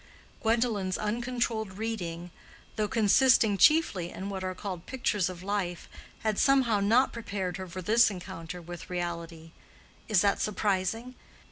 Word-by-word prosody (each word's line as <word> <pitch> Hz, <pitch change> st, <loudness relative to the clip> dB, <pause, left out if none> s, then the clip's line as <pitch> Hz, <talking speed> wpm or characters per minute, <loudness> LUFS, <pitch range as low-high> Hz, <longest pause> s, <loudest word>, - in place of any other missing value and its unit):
Gwendolen's 220 Hz, -5 st, +1 dB
uncontrolled 225 Hz, -2 st, -2 dB
reading, 175 Hz, -6 st, -4 dB, 0.4 s
though 215 Hz, -1 st, 0 dB
consisting 225 Hz, -1 st, +4 dB
chiefly 250 Hz, -, +4 dB
in 195 Hz, +2 st, -6 dB
what 190 Hz, -1 st, -4 dB
are 185 Hz, 0 st, -3 dB
called 185 Hz, -3 st, -6 dB
pictures 210 Hz, -8 st, 0 dB
of 180 Hz, -1 st, -8 dB
life, 190 Hz, -3 st, -2 dB, 0.3 s
had 215 Hz, -2 st, 0 dB
somehow 260 Hz, -6 st, +4 dB
not 230 Hz, +6 st, +3 dB
prepared 195 Hz, -6 st, -4 dB
her 190 Hz, -1 st, -6 dB
for 185 Hz, +1 st, -7 dB
this 225 Hz, +6 st, +5 dB
encounter 180 Hz, -3 st, -7 dB
with 175 Hz, +1 st, -9 dB
reality. 170 Hz, -2 st, -5 dB, 0.6 s
Is 210 Hz, -5 st, +4 dB
that 200 Hz, -1 st, +2 dB
surprising? 210 Hz, +3 st, -1 dB
200 Hz, 135 wpm, -29 LUFS, 180-225 Hz, 0.6 s, this